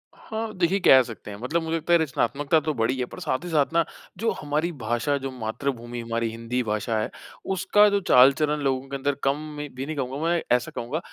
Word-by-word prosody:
हाँ, 220 Hz, 0 st, -5 dB
देखिए 185 Hz, +2 st, +2 dB
कह 135 Hz, -7 st, +7 dB
सकते 110 Hz, -3 st, -9 dB
हैं। 100 Hz, -, -7 dB
मतलब 165 Hz, +7 st, 0 dB
मुझे 160 Hz, 0 st, -1 dB
लगता 165 Hz, +1 st, 0 dB
है -, -, +8 dB
रचनात्मकता 145 Hz, +1 st, +1 dB
तो 155 Hz, -1 st, -2 dB
बढ़ी 115 Hz, +2 st, 0 dB
है, 125 Hz, -, 0 dB
पर -, -, -11 dB
साथ 130 Hz, +6 st, -2 dB
ही 175 Hz, -, -5 dB
साथ 155 Hz, 0 st, +1 dB
ना 170 Hz, -, +4 dB, 0.3 s
जो 225 Hz, +3 st, 0 dB
हमारी 150 Hz, +4 st, -1 dB
भाषा, 120 Hz, 0 st, -1 dB
जो 135 Hz, -1 st, -5 dB
मातृभूमि 120 Hz, 0 st, -4 dB
हमारी 115 Hz, 0 st, -2 dB
हिंदी 115 Hz, +2 st, -2 dB
भाषा 110 Hz, +1 st, -1 dB
है, 110 Hz, -, -2 dB, 0.4 s
उसका 205 Hz, +3 st, +4 dB
जो 200 Hz, 0 st, +2 dB
चाल-चलन 145 Hz, +4 st, +5 dB
लोगों 135 Hz, -1 st, 0 dB
के 140 Hz, -, -4 dB
अंदर 140 Hz, +1 st, -1 dB
कम 135 Hz, +1 st, +2 dB, 0.2 s
में 145 Hz, 0 st, -5 dB
भी 130 Hz, +2 st, -4 dB
नहीं 155 Hz, -, -4 dB
कहूँगा 135 Hz, -1 st, -3 dB
मैं, 170 Hz, 0 st, +2 dB
ऐसा 125 Hz, 0 st, +2 dB
कहूँगा 130 Hz, +7 st, -3 dB
140 Hz, 220 wpm, -25 LUFS, 120-160 Hz, 0.4 s, है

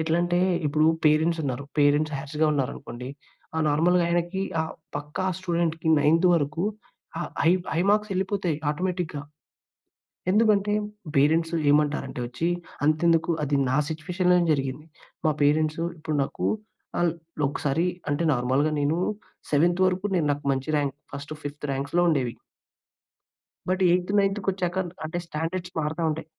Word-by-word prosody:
ఎట్లంటే, 175 Hz, +2 st, +1 dB, 0.3 s
ఇప్పుడు 155 Hz, +2 st, +2 dB, 0.2 s
పేరెంట్స్ 155 Hz, +2 st, +3 dB
ఉన్నారు. 135 Hz, 0 st, -3 dB, 0.2 s
పేరెంట్స్ 145 Hz, +1 st, +3 dB
హార్స్‌గా 150 Hz, +2 st, -1 dB
ఉన్నారనుకోండి. 125 Hz, -2 st, -4 dB, 0.5 s
ఆహ్, 160 Hz, -, +1 dB
నార్మల్‌గా 170 Hz, +4 st, +3 dB
ఆయనకి 175 Hz, +2 st, 0 dB, 0.2 s
ఆహ్, 160 Hz, -, -5 dB, 0.2 s
పక్కా 150 Hz, +5 st, -4 dB, 0.2 s
స్టూడెంట్‌కి 170 Hz, -3 st, -1 dB
నైంత్ 165 Hz, +5 st, +4 dB
వరకు 150 Hz, +3 st, 0 dB, 0.6 s
ఆహ్, -, -, -4 dB
హై 165 Hz, -, +5 dB, 0.2 s
హై 165 Hz, -, +1 dB
మార్క్సెళ్ళిపోతాయి 195 Hz, -4 st, 0 dB, 0.2 s
ఆటోమేటిక్‌గా. 175 Hz, -2 st, -2 dB, 1.1 s
ఎందుకంటే, 210 Hz, -1 st, +3 dB, 0.4 s
పేరెంట్సు 165 Hz, +4 st, +3 dB
ఏమంటారంటే 145 Hz, -3 st, +1 dB
వచ్చి 125 Hz, +7 st, -3 dB, 0.4 s
అంతెందుకు 165 Hz, +2 st, +3 dB
అది 145 Hz, -1 st, +1 dB
నా 130 Hz, -, +1 dB
సిట్యుయేషన్‌లోనే 180 Hz, +3 st, +1 dB
జరిగింది. 135 Hz, +2 st, -3 dB, 0.4 s
మా 155 Hz, -, +4 dB
పేరెంట్సు 155 Hz, +2 st, +2 dB, 0.2 s
ఇప్పుడు 155 Hz, -1 st, -2 dB
నాకు 135 Hz, -, -3 dB, 0.5 s
అన్ 175 Hz, -1 st, +3 dB, 0.3 s
ఒకసారి 145 Hz, +4 st, 0 dB, 0.2 s
అంటే, 145 Hz, +3 st, 0 dB
నార్మల్‌గా 130 Hz, +5 st, +1 dB
నేను, 150 Hz, +4 st, +1 dB, 0.5 s
సెవెంత్ 175 Hz, +5 st, +3 dB
వరకు 185 Hz, +2 st, 0 dB
నేను 165 Hz, -4 st, +1 dB
నాకు 145 Hz, +1 st, -5 dB
మంచి 135 Hz, +3 st, -3 dB
ర్యాంక్ 140 Hz, -1 st, -1 dB, 0.2 s
ఫస్ట్ 140 Hz, +2 st, -6 dB
ఫిఫ్త్ 145 Hz, +1 st, -5 dB
ర్యాంక్స్‌లో 140 Hz, +6 st, 0 dB
ఉండేవి. 130 Hz, -6 st, 0 dB, 1.3 s
బట్, 185 Hz, +1 st, 0 dB
ఎయిత్ 180 Hz, +2 st, +1 dB
నైంత్‌కొచ్చాక 195 Hz, -2 st, 0 dB, 0.3 s
అంటే 170 Hz, +2 st, -3 dB
స్టాండర్డ్స్ 170 Hz, +3 st, -4 dB
మారుతుంటాయి. 160 Hz, 0 st, -1 dB
160 Hz, 125 wpm, -26 LUFS, 145-175 Hz, 1.3 s, హై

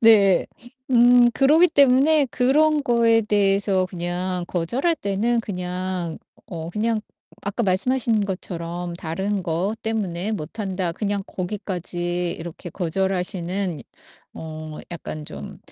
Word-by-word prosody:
네 205 Hz, -5 st, +6 dB, 0.5 s
음 245 Hz, 0 st, +7 dB
그러기 305 Hz, +6 st, +5 dB
때문에 280 Hz, +1 st, +5 dB
그런 295 Hz, +4 st, +3 dB
거에 230 Hz, -2 st, +4 dB
대해서 200 Hz, -2 st, +2 dB
그냥 180 Hz, 0 st, -3 dB
거절할 235 Hz, -, 0 dB
때는 225 Hz, 0 st, 0 dB
그냥 180 Hz, -3 st, -4 dB, 0.3 s
어 165 Hz, -2 st, -6 dB
그냥 220 Hz, +2 st, 0 dB, 0.4 s
아까 205 Hz, +4 st, -2 dB
말씀하신 225 Hz, +4 st, +2 dB
것처럼 175 Hz, -2 st, -4 dB
"다른 190 Hz, +4 st, -2 dB
것 175 Hz, +5 st, -1 dB
때문에 205 Hz, -4 st, -2 dB
못 205 Hz, +3 st, -5 dB
한다." 185 Hz, -3 st, -2 dB
그냥 205 Hz, +1 st, -2 dB
거기까지 180 Hz, -2 st, -3 dB
이렇게 170 Hz, +1 st, -8 dB
거절하시는 180 Hz, -1 st, -1 dB, 0.5 s
어 155 Hz, -1 st, -7 dB
약간 155 Hz, -2 st, -6 dB
좀 70 Hz, -, -9 dB
195 Hz, 240 characters per minute, -23 LUFS, 175-225 Hz, 0.5 s, 음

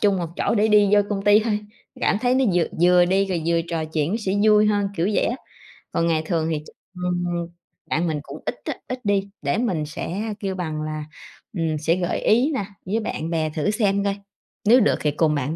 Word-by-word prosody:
trung 200 Hz, -2 st, +3 dB
một 175 Hz, -, -2 dB
chỗ -, -, +1 dB
để 215 Hz, 0 st, +3 dB
đi 210 Hz, -1 st, +5 dB
vô 205 Hz, -, +6 dB
công 200 Hz, -1 st, -1 dB
ty 205 Hz, +1 st, +6 dB
thôi, 210 Hz, -2 st, 0 dB, 0.4 s
cảm -, -, +2 dB
thấy 250 Hz, 0 st, +2 dB
nó 265 Hz, 0 st, +3 dB
vừa 175 Hz, -2 st, +3 dB, 0.2 s
vừa 180 Hz, 0 st, +6 dB
đi 190 Hz, +2 st, +2 dB
rồi 180 Hz, -4 st, -2 dB
vừa 170 Hz, 0 st, +2 dB
trò 165 Hz, -2 st, -2 dB
chuyện 155 Hz, 0 st, -1 dB
nó 210 Hz, -, 0 dB
sẽ 190 Hz, -3 st, -1 dB
vui 210 Hz, -1 st, +5 dB
hơn, 205 Hz, -1 st, +1 dB
kiểu 170 Hz, +1 st, +1 dB
vậy -, -, +2 dB
á. 240 Hz, -, -1 dB, 0.6 s
Còn 165 Hz, -, +1 dB
ngày 160 Hz, -2 st, +2 dB
thường 160 Hz, -2 st, 0 dB
thì 155 Hz, -, -1 dB
ch -, -, -12 dB, 0.3 s
ừm, 180 Hz, 0 st, 0 dB, 0.6 s
bạn 170 Hz, +3 st, 0 dB
mình 155 Hz, -2 st, -1 dB
cũng -, -, -10 dB
ít -, -, -2 dB
á, -, -, -1 dB
ít 255 Hz, 0 st, -4 dB
đi 200 Hz, -1 st, +1 dB
để 140 Hz, +4 st, 0 dB
mình 185 Hz, -10 st, 0 dB
sẽ 195 Hz, +8 st, -4 dB
kêu 195 Hz, -2 st, -3 dB
bằng 160 Hz, -4 st, -3 dB
là, 155 Hz, 0 st, -4 dB, 0.5 s
ừm, 160 Hz, -2 st, 0 dB
sẽ 160 Hz, +3 st, +1 dB
gợi 180 Hz, -1 st, -1 dB
ý 250 Hz, +8 st, +3 dB
nè 255 Hz, -8 st, -1 dB, 0.2 s
với 205 Hz, +4 st, 0 dB
bạn 165 Hz, -7 st, -4 dB
bè 160 Hz, -2 st, 0 dB
thử 155 Hz, +5 st, -1 dB
xem 200 Hz, -2 st, +1 dB
coi, 200 Hz, -1 st, 0 dB, 0.5 s
nếu 235 Hz, +5 st, +7 dB
được -, -, +3 dB
thì 150 Hz, -, +1 dB
cùng 150 Hz, +1 st, +1 dB
bạn 145 Hz, +2 st, -2 dB
180 Hz, 235 wpm, -23 LUFS, 160-210 Hz, 0.6 s, nếu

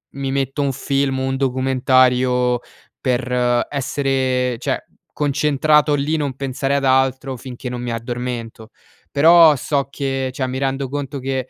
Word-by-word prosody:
mi 135 Hz, -1 st, -3 dB
metto 135 Hz, +1 st, -1 dB
un 140 Hz, -1 st, 0 dB
film, 135 Hz, 0 st, -1 dB
un 130 Hz, 0 st, -1 dB
documentario 130 Hz, -1 st, +2 dB, 0.4 s
per 125 Hz, -1 st, 0 dB
essere 130 Hz, -3 st, -1 dB
cioè -, -, -2 dB, 0.3 s
concentrato 150 Hz, +1 st, +2 dB
lì 145 Hz, +3 st, 0 dB
non 140 Hz, -4 st, -2 dB
pensare 135 Hz, +1 st, -2 dB
ad 140 Hz, -, 0 dB
altro 130 Hz, 0 st, +1 dB
finché 125 Hz, 0 st, -7 dB
non 125 Hz, 0 st, -5 dB
mi 120 Hz, -1 st, -3 dB
addormento. 115 Hz, -1 st, -5 dB, 0.4 s
Però 160 Hz, +1 st, +7 dB
so 140 Hz, 0 st, -1 dB
che 135 Hz, -2 st, -2 dB
cioè 130 Hz, 0 st, -2 dB
mi 130 Hz, +1 st, -4 dB
rendo 135 Hz, 0 st, -2 dB
conto 140 Hz, 0 st, -4 dB
che 130 Hz, -1 st, -3 dB
130 Hz, 140 wpm, -19 LUFS, 125-140 Hz, 0.4 s, Però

